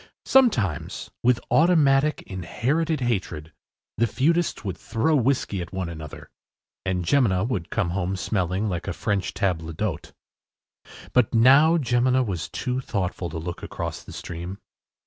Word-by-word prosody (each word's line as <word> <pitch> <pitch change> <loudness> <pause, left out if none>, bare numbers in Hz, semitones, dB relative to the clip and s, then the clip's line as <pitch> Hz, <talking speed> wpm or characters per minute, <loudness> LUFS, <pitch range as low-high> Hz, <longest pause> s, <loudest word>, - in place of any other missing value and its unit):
Sometimes, 120 - +2
with 125 0 +3
automatic 150 -3 +4
inherited 135 - -1
hatred, 95 -10 -2 0.4
the 115 - +3
feudists 165 +5 0
would 95 -3 -2
throw 115 - 0
whiskey 125 -7 +1
at 85 - -7
each 95 - -4 0.2
other, 75 -1 -10 0.5
and 90 -2 -1
Jemina 105 -5 +2
would 95 -10 -3
come 100 -7 -1
home 95 +1 -1
smelling 95 +1 -1
like 90 -2 -3
a 95 - -1
French 100 +1 -2
table 80 -4 -1
d’hôte. 85 -1 -4 1.0
But 125 -2 +3
now 140 +8 +6
Jemina 130 -2 +2
was 90 -7 -4
too 125 -1 -2
thoughtful 95 -6 -3
to - - -6
look 85 +2 -5
across - - -5
the - - -12
stream. 85 +3 -6
105 Hz, 140 wpm, -24 LUFS, 90-130 Hz, 1.0 s, now